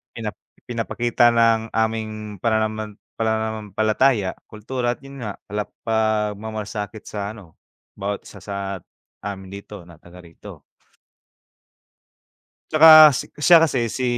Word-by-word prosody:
pina 115 -2 -4 0.3
pinapakita 120 0 +1
ng 115 -1 +2
aming 110 -2 -2
pananaman 110 -1 -1 0.2
pananampalataya, 110 0 0 0.2
kultura 120 +3 -3
at - - -29
'yon 135 -3 -9
nga 100 - -4 0.2
pala 105 +1 -2 0.2
pagmamlasakit 110 -1 -2
sa 100 0 -5
ano 95 -7 -16 0.4
bawat 100 +1 -3
isa 100 - -13
sa 100 -1 -6 0.7
amin 95 -2 -6
dito, 100 -1 -10
na 85 -1 -16
taga 90 +2 -15
rito. 85 -1 -13 2.1
Tsaka 155 -1 +9
si - - -4
siya 165 +2 +7
kasi 130 -7 +1
si 130 +3 -3
110 Hz, 115 wpm, -22 LUFS, 105-115 Hz, 2.1 s, Tsaka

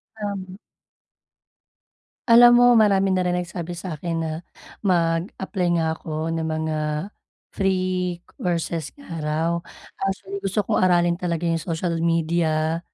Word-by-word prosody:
Tama. 200 -3 -5 1.7
Alam 240 +1 +9
mo 245 - +6 0.2
marami 195 -2 +3
na 185 - +2
rin 180 0 +1
nagsabi 175 -1 -4
sa'kin 170 -1 -4
na - - -2 0.6
mag-apply 180 +2 0
nga 165 - +1
ako 160 - -10 0.3
ng 165 -1 -2
mga 155 0 -2 0.8
free 190 -2 +1 0.4
courses 170 -2 -3
nga 285 - -15
raw. 155 +2 0 0.5
Actually, 195 +1 -3
gusto 200 +1 -1
kong - - +1
aralin 175 -1 +3
talaga 170 -1 -2
yung 165 -1 +1
social 170 +1 -2
media, 165 -1 +1
175 Hz, 120 wpm, -23 LUFS, 165-190 Hz, 1.7 s, Alam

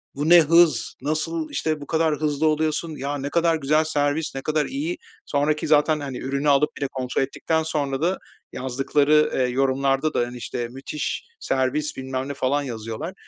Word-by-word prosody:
"Bu 145 +3 -1
ne 175 0 +9
hız, 160 -6 +3
nasıl, 155 +2 -2
işte, 155 -2 -2
bu 145 - -8
kadar 160 -1 +1
hızlı 150 0 0
oluyorsun, 155 +1 0
ya 140 +2 -3
ne 140 +1 -4
kadar 165 +1 +2
güzel 155 +1 +2
servis, 150 0 -1
ne 135 - -3
kadar 155 +1 0
iyi!" 305 +6 -3 0.3
Sonraki 150 +2 0
zaten, 150 +1 +3
hani, 135 -3 -5
ürünü 140 +2 -1
alıp 145 +1 +4
bir - - -10
de 135 - +1
kontrol 130 -1 -2
ettikten 160 +4 -1
sonra 145 -4 -2
da 180 +3 +1 0.4
yazdıkları, 140 +4 +2
ııı, 125 -1 +1
yorumlarda 135 +3 +1
da, - - +1
hani, 120 +1 -2
işte, 120 0 -4
"Müthiş 135 +4 -4 0.2
servis 135 - -1
bilmem 130 0 -3
ne." 140 - -4
falan 140 +1 0
yazıyorlar. 115 - -5
145 Hz, 180 wpm, -23 LUFS, 135-155 Hz, 0.4 s, ne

